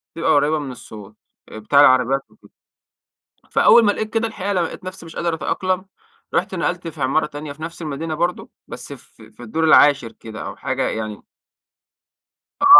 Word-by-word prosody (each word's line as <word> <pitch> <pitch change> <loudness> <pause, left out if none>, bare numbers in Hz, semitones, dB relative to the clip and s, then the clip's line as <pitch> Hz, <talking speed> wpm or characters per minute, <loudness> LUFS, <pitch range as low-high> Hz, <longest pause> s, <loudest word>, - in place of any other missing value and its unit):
بتبقى 165 - +1
قريبة 150 +2 +3
مِن 140 -3 -5
الصوت 110 -4 -11 0.3
آآ 110 - -8
بتاع 140 +6 +3
العربيّات 130 0 +5 1.1
وكده. - - -34
فأول 235 - +6
ما 205 - +5
لقيت 215 +1 -4
كده 230 0 +1
الحقيقة 205 -2 -3
لمّا 175 -3 +1
لقيت 185 - -10
نفسي 185 -2 -8
مش 165 - -11
قادر 170 -1 -1
أتأقلم، 185 +3 -1 0.5
رُحت 190 +2 0
نقلت 175 0 -2
في 160 -3 -8
عمارة 135 +4 +2
تانية 145 0 -7
في 150 - -18
نفس 170 +1 -7
المدينة 155 +1 -4
برضو، 175 +3 -2 0.2
بس - - -8
في 110 0 -16
في 110 +3 -13
الدور 155 +8 -2
العاشر 145 -6 +5
كده 110 -1 -9
أو - - -6
حاجة - - -1
يعني 110 -1 -5 1.4
آه، - - +4
155 Hz, 180 wpm, -21 LUFS, 130-180 Hz, 1.4 s, فأول